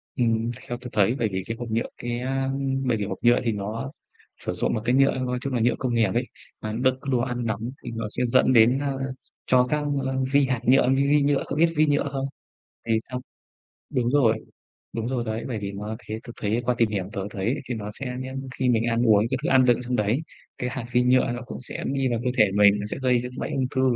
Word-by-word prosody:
Ừm, 115 Hz, -1 st, +1 dB, 0.2 s
theo 120 Hz, -, -3 dB
tớ 125 Hz, -, -7 dB
thấy 105 Hz, +4 st, +3 dB
bởi 115 Hz, -, +1 dB
vì 95 Hz, 0 st, -2 dB
cái 115 Hz, -, -4 dB
hộp 120 Hz, -1 st, -5 dB
nhựa 115 Hz, +1 st, 0 dB
cái, 120 Hz, 0 st, -3 dB
a, 135 Hz, +2 st, -1 dB
ưm, 135 Hz, -1 st, -1 dB
bởi 120 Hz, -2 st, +2 dB
vì 105 Hz, -, -2 dB
hộp 100 Hz, -, -4 dB
nhựa 120 Hz, 0 st, +5 dB
thì 115 Hz, -, +1 dB
nó 110 Hz, +6 st, -4 dB, 0.5 s
sử -, -, -4 dB
dụng -, -, 0 dB
một 110 Hz, -, -1 dB
cái 120 Hz, +1 st, +3 dB
nhựa, 135 Hz, +1 st, +5 dB
nói 125 Hz, -1 st, -1 dB
chung 135 Hz, -1 st, -3 dB
là 125 Hz, -, +1 dB
nhựa 120 Hz, +2 st, +3 dB
công 130 Hz, -3 st, -1 dB
nghiệp 115 Hz, -1 st, +3 dB
ấy, 120 Hz, +2 st, 0 dB, 0.3 s
mà 110 Hz, 0 st, -4 dB
đựng 130 Hz, 0 st, +2 dB
đồ 125 Hz, -, +3 dB
ăn 120 Hz, -1 st, -2 dB
nóng 110 Hz, +2 st, -2 dB
thì 120 Hz, -, -5 dB
nó 115 Hz, -1 st, -3 dB
sẽ 125 Hz, -, -1 dB
dẫn 130 Hz, +1 st, +4 dB
đến 120 Hz, +3 st, +6 dB
a, 140 Hz, -1 st, -1 dB, 0.5 s
cho 125 Hz, 0 st, +4 dB
các, 150 Hz, 0 st, +1 dB, 0.2 s
ơ, 130 Hz, 0 st, -1 dB, 0.2 s
vi 140 Hz, 0 st, +5 dB
hạt 130 Hz, -2 st, 0 dB
nhựa, 130 Hz, 0 st, +5 dB
vi 135 Hz, +1 st, +3 dB
vi 145 Hz, +1 st, +4 dB
nhựa, 140 Hz, -1 st, +2 dB
cậu 140 Hz, -, -3 dB
biết 165 Hz, +1 st, +4 dB
vi 155 Hz, +1 st, +4 dB
nhựa 145 Hz, -1 st, +2 dB
không? 135 Hz, -1 st, -2 dB, 0.6 s
Thì 115 Hz, -, +1 dB, 0.2 s
trong 125 Hz, 0 st, -3 dB, 0.7 s
đúng 120 Hz, -1 st, +1 dB
rồi, 120 Hz, -6 st, +3 dB, 0.5 s
đúng 115 Hz, 0 st, -3 dB
rồi 125 Hz, -2 st, -1 dB
đấy, 110 Hz, 0 st, -3 dB
bởi 120 Hz, -4 st, -2 dB
vì 100 Hz, -1 st, -4 dB
nó 105 Hz, +2 st, -5 dB
thế 110 Hz, -, -3 dB
tớ 120 Hz, -, -7 dB
thấy 110 Hz, +3 st, 0 dB
qua 125 Hz, -, +2 dB
tìm 115 Hz, -, +4 dB
hiểu 100 Hz, -3 st, -3 dB
tớ 100 Hz, -, -3 dB
thấy 105 Hz, +6 st, -1 dB
thì 125 Hz, -, -1 dB
nó 105 Hz, -2 st, -5 dB
sẽ 130 Hz, -3 st, -3 dB
nhé, 130 Hz, 0 st, -6 dB, 0.2 s
khi 130 Hz, -, +1 dB
mình 115 Hz, -2 st, +3 dB
ăn 115 Hz, 0 st, +1 dB
uống 105 Hz, -2 st, +5 dB
các 130 Hz, -, +1 dB
thức -, -, -1 dB
ăn 130 Hz, -1 st, +6 dB
đựng 120 Hz, -1 st, +4 dB
trong 125 Hz, 0 st, -1 dB
đấy, 110 Hz, +7 st, +1 dB, 0.4 s
cái 125 Hz, -, -2 dB
hạt 130 Hz, -2 st, -4 dB
vi 125 Hz, +1 st, +4 dB
nhựa 125 Hz, -1 st, +3 dB
nó 120 Hz, +1 st, -5 dB
cũng -, -, -7 dB
sẽ 125 Hz, -, -7 dB
đi 135 Hz, -1 st, 0 dB
vào 120 Hz, -2 st, 0 dB
cơ 125 Hz, -, +2 dB
thể 110 Hz, -, +7 dB
mình, 100 Hz, 0 st, +6 dB
nó 105 Hz, -, -4 dB
sẽ -, -, -3 dB
gây 130 Hz, -1 st, +3 dB
ra 125 Hz, -, -5 dB
cái 125 Hz, -, -11 dB
bệnh -, -, -3 dB
ung 130 Hz, -2 st, +1 dB
thư 130 Hz, -, +3 dB
125 Hz, 270 wpm, -25 LUFS, 115-130 Hz, 0.7 s, thể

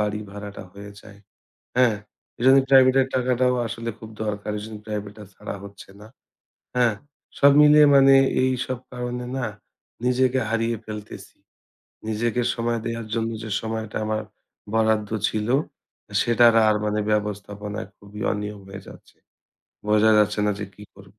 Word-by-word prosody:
বাড়ি 105 Hz, 0 st, -1 dB
ভাড়াটা 105 Hz, -1 st, -8 dB
হয়ে 100 Hz, +1 st, -10 dB
যায়, 100 Hz, -2 st, -15 dB, 0.6 s
হ্যাঁ? 120 Hz, -4 st, +4 dB, 0.4 s
এজন্য 130 Hz, +3 st, +6 dB
প্রাইভেট 130 Hz, -1 st, +6 dB
এর 130 Hz, -, -4 dB
টাকাটাও 125 Hz, 0 st, +1 dB
আসলে 115 Hz, +1 st, -5 dB
খুব 110 Hz, -, -10 dB, 0.2 s
দরকার। 105 Hz, 0 st, -4 dB
এজন্য 110 Hz, 0 st, -8 dB
প্রাইভেটা 105 Hz, 0 st, -6 dB
ছাড়া -, -, -7 dB
হচ্ছে 100 Hz, -1 st, -12 dB
না, 105 Hz, -, -12 dB, 0.7 s
হ্যাঁ? 120 Hz, -4 st, +3 dB, 0.4 s
সব 140 Hz, 0 st, +6 dB
মিলে 150 Hz, 0 st, +7 dB
মানে 135 Hz, 0 st, +7 dB, 0.3 s
এইসব 130 Hz, -1 st, -1 dB
কারণে 125 Hz, 0 st, -4 dB
না 125 Hz, -, -1 dB, 0.6 s
নিজেকে 130 Hz, +1 st, +2 dB
হারিয়ে 115 Hz, 0 st, 0 dB
ফেলতেছি। 105 Hz, -1 st, -9 dB, 0.7 s
নিজেকে 120 Hz, +2 st, -1 dB
সময় 115 Hz, 0 st, -1 dB
দেয়ার 115 Hz, -1 st, -4 dB
জন্য 115 Hz, 0 st, -1 dB
যে 110 Hz, -, -7 dB
সময়টা 110 Hz, -1 st, -5 dB
আমার 110 Hz, 0 st, -1 dB, 0.5 s
বরাদ্দ 110 Hz, -1 st, +1 dB, 0.2 s
ছিল 110 Hz, +1 st, -3 dB, 0.7 s
সেটা 120 Hz, 0 st, +4 dB, 0.2 s
আর 105 Hz, -, +3 dB
মানে 105 Hz, 0 st, 0 dB
ব্যবস্থাপনায় 105 Hz, 0 st, -4 dB
খুবই 105 Hz, +1 st, -12 dB
অনিয়ম 105 Hz, 0 st, -5 dB
হয়ে 100 Hz, 0 st, -8 dB
যাচ্ছে -, -, -15 dB, 0.7 s
বোঝা 105 Hz, +1 st, +4 dB
যাচ্ছে 105 Hz, 0 st, +2 dB
না 105 Hz, -, +2 dB
যে 105 Hz, -, -4 dB
কি 105 Hz, -, -12 dB
কর 95 Hz, 0 st, -16 dB
110 Hz, 140 wpm, -23 LUFS, 105-125 Hz, 0.7 s, মিলে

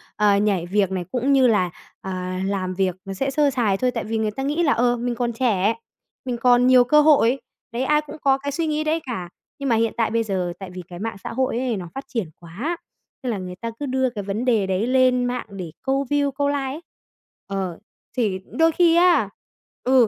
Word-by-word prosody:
ờ, 205 Hz, -1 st, +4 dB
nhảy 200 Hz, -4 st, +1 dB
việc 195 Hz, +1 st, +1 dB
này 185 Hz, -2 st, -2 dB
cũng 260 Hz, +3 st, +1 dB
như 265 Hz, -2 st, +5 dB
là, 205 Hz, -6 st, +2 dB, 0.3 s
à, 185 Hz, -1 st, -4 dB
làm 190 Hz, -2 st, -1 dB
việc 185 Hz, -1 st, 0 dB
nó 195 Hz, -, -5 dB
sẽ 270 Hz, +8 st, -1 dB
sơ 290 Hz, +1 st, +3 dB
sài 225 Hz, -7 st, +1 dB
thôi. 250 Hz, +4 st, +1 dB
Tại 230 Hz, -2 st, -3 dB
vì 225 Hz, +1 st, -2 dB
người 220 Hz, -1 st, 0 dB
ta 270 Hz, +6 st, -5 dB
nghĩ 295 Hz, +5 st, 0 dB
là, 295 Hz, -, +4 dB
ờ, 245 Hz, +1 st, +2 dB
mình 240 Hz, 0 st, -2 dB
còn 240 Hz, 0 st, -1 dB
trẻ, 225 Hz, -3 st, +1 dB, 0.5 s
mình 250 Hz, -2 st, -2 dB
còn 245 Hz, +1 st, +4 dB
nhiều 255 Hz, -1 st, +7 dB
cơ 300 Hz, +5 st, +5 dB
hội. 275 Hz, -4 st, +4 dB, 0.3 s
Đấy, 235 Hz, +3 st, -2 dB
ai 300 Hz, +2 st, +3 dB
cũng 300 Hz, +1 st, -10 dB
có 270 Hz, -1 st, +4 dB
cái 285 Hz, +1 st, -4 dB
suy 325 Hz, +3 st, -1 dB
nghĩ 305 Hz, 0 st, 0 dB
đấy 310 Hz, +1 st, +1 dB
cả. 185 Hz, -8 st, -4 dB, 0.3 s
Nhưng 275 Hz, -1 st, -2 dB
mà 235 Hz, -, +4 dB
hiện 225 Hz, 0 st, +1 dB
tại 225 Hz, -2 st, +1 dB
bây 230 Hz, 0 st, +1 dB
giờ 185 Hz, -5 st, -2 dB
tại 190 Hz, -2 st, -7 dB
vì 180 Hz, 0 st, -7 dB
cái 175 Hz, -1 st, -9 dB
mạng 225 Hz, -1 st, -4 dB
xã -, -, -5 dB
hội 255 Hz, -1 st, 0 dB
ấy 250 Hz, -4 st, -1 dB
nó 180 Hz, -2 st, -6 dB
phát 270 Hz, -, -5 dB
triển 225 Hz, -10 st, -3 dB
quá, 215 Hz, -, -4 dB, 0.5 s
nên 250 Hz, -, -1 dB
là 215 Hz, -, -2 dB
người 180 Hz, -1 st, -6 dB
ta 230 Hz, +5 st, -5 dB
cứ 290 Hz, -, -2 dB
đưa 260 Hz, -1 st, +1 dB
cái 215 Hz, -4 st, -6 dB
vấn 205 Hz, +5 st, -3 dB
đề 225 Hz, -6 st, +2 dB
đấy 190 Hz, +4 st, 0 dB
lên 255 Hz, -1 st, +3 dB
mạng 245 Hz, 0 st, -2 dB
để 185 Hz, -5 st, -7 dB
câu 270 Hz, +1 st, 0 dB
view, 285 Hz, -1 st, +2 dB
câu 285 Hz, +1 st, 0 dB
like 285 Hz, -, +1 dB
ấy. 270 Hz, +3 st, -4 dB, 0.7 s
Ờ, 190 Hz, -3 st, -3 dB, 0.4 s
thì 205 Hz, -6 st, +1 dB
đôi 325 Hz, +1 st, +3 dB
khi 335 Hz, 0 st, +4 dB
á 340 Hz, -, +4 dB, 0.5 s
ừ, 255 Hz, -2 st, +5 dB
240 Hz, 240 wpm, -23 LUFS, 195-270 Hz, 0.7 s, nhiều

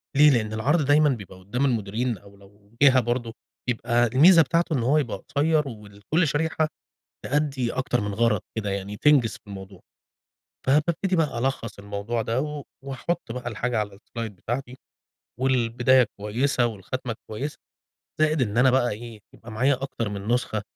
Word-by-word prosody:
ليه 150 Hz, +2 st, +7 dB
لأن 110 Hz, -3 st, 0 dB
العرض 145 Hz, +9 st, +2 dB
دايمًا 150 Hz, +1 st, +5 dB
بيبقى 100 Hz, -8 st, -5 dB
قُدّام 110 Hz, +9 st, -1 dB
المديرين، 115 Hz, -1 st, -1 dB
أو 100 Hz, +2 st, -17 dB
لو 100 Hz, +1 st, -21 dB
جهة 130 Hz, -2 st, +7 dB
برضه، 120 Hz, -1 st, -2 dB, 0.3 s
بيبقى 120 Hz, 0 st, +2 dB
الميزة 165 Hz, +9 st, +7 dB
بتاعته 165 Hz, +2 st, +1 dB
إن 120 Hz, -, -1 dB
هو 140 Hz, +6 st, +3 dB
يبقى 120 Hz, -9 st, -1 dB
قصيّر 150 Hz, +4 st, 0 dB
وكل 105 Hz, -, -2 dB
شريحة 155 Hz, +2 st, 0 dB, 0.6 s
تأدّي 140 Hz, -4 st, 0 dB
أكتر 130 Hz, -2 st, 0 dB
من 105 Hz, 0 st, -3 dB
غرض 115 Hz, -2 st, +2 dB, 0.2 s
كده، 105 Hz, -2 st, -2 dB
يعني 100 Hz, +1 st, -4 dB
تنجز 135 Hz, -2 st, +4 dB
في -, -, -13 dB
الموضوع، 95 Hz, -2 st, -10 dB, 0.9 s
فبابتدي 170 Hz, +6 st, +2 dB
بقى 150 Hz, -7 st, 0 dB
ألخّص 120 Hz, -3 st, -2 dB
الموضوع 100 Hz, +3 st, -3 dB
ده، 115 Hz, +3 st, -1 dB
و 150 Hz, 0 st, -4 dB, 0.2 s
وأحط 135 Hz, 0 st, -3 dB
بقى 125 Hz, -1 st, -5 dB
الحاجة 120 Hz, +1 st, -1 dB
على 105 Hz, -2 st, -3 dB
الSlide 115 Hz, +1 st, -7 dB
بتاعتي، 125 Hz, +7 st, -5 dB, 0.6 s
والبداية 125 Hz, -1 st, +3 dB
كويسة، 120 Hz, +4 st, +1 dB
والخاتمة 115 Hz, +3 st, -4 dB, 0.2 s
كويسة، 135 Hz, +8 st, -4 dB, 0.6 s
زائد 155 Hz, -2 st, +3 dB
إن 105 Hz, -2 st, -1 dB
أنا 130 Hz, +2 st, +6 dB
بقى 125 Hz, -1 st, +3 dB
إيه، 115 Hz, +1 st, -8 dB
يبقى 115 Hz, -, -12 dB
معايا 130 Hz, +5 st, +2 dB
أكتر 120 Hz, -5 st, -3 dB
من 100 Hz, 0 st, -6 dB
نسخة، 120 Hz, -3 st, 0 dB
120 Hz, 160 wpm, -25 LUFS, 105-140 Hz, 0.9 s, ليه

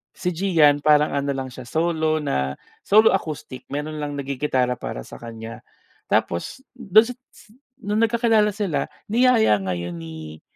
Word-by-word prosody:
Si 180 Hz, 0 st, -2 dB
Gian, 160 Hz, -6 st, +3 dB
parang 150 Hz, 0 st, +4 dB
ano 140 Hz, 0 st, -1 dB
lang 130 Hz, -1 st, -4 dB
siya, 125 Hz, 0 st, -9 dB
solo 160 Hz, -1 st, +1 dB
na, 70 Hz, -, -2 dB, 0.2 s
solo 215 Hz, +2 st, +5 dB
acoustic. 150 Hz, -8 st, -4 dB
Mayro'n 150 Hz, +2 st, -4 dB
lang 145 Hz, 0 st, -3 dB
nag-gigitara 135 Hz, -2 st, 0 dB
para -, -, -6 dB
sa -, -, -12 dB
kanya. 115 Hz, -1 st, -8 dB, 0.5 s
Tapos, 85 Hz, -, -1 dB
do'n 220 Hz, -3 st, +4 dB
si 250 Hz, -, -5 dB, 0.2 s
si 210 Hz, -, -20 dB, 0.3 s
no'ng 210 Hz, 0 st, -1 dB
nagkakilala 225 Hz, -3 st, +3 dB
sila, 200 Hz, -6 st, -2 dB, 0.2 s
niyaya 230 Hz, -, +4 dB
ngayon 85 Hz, -2 st, -4 dB
ni 80 Hz, -1 st, -9 dB
150 Hz, 150 wpm, -22 LUFS, 120-205 Hz, 0.5 s, solo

